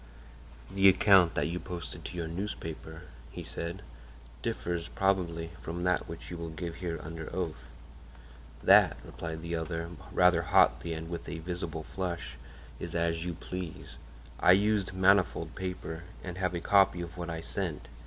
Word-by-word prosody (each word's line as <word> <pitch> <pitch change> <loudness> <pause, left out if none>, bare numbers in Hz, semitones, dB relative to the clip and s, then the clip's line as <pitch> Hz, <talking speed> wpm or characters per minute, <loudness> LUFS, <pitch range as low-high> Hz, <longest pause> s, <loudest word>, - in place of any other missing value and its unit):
"The 95 0 +7
account 95 -2 +6
that - - +1
you 85 +2 -2
posted 90 -3 -6
to - - -6
your 85 -1 -2
newspaper," 80 -2 -5 0.3
he - - -7
said, 85 +4 -5 0.6
"differs, 85 +3 -2
probably, 85 -4 0
from 85 +2 -4
that 90 0 +1
which 80 +1 -8
you 85 - -4
will 85 -1 -5
give 85 +1 -5
here 85 -2 -3
under 80 0 -6
oath." 85 -4 -4 0.9
"That," - - +7
replied 80 -1 -6
the 85 0 -4
other, 85 0 -3 0.2
rather 90 -2 +5
hotly 85 0 +4
and 80 0 -5
with 85 0 -5
a 85 - -4
visible 85 -1 -4
flush, 90 0 -4 0.4
"is 85 0 -5
as 85 -1 +1
you 90 -1 -3
please. 90 -1 -6 0.4
I 90 - +7
used 100 0 +2
manifold 95 -3 +3
paper 90 -3 -4 0.2
and 90 0 -6
have 90 -1 0
a 85 - -2
copy 95 -3 +4
of 85 0 -7
what 85 -1 -5
I 80 -1 -3
sent. 85 -2 -3
85 Hz, 160 wpm, -31 LUFS, 80-90 Hz, 0.9 s, The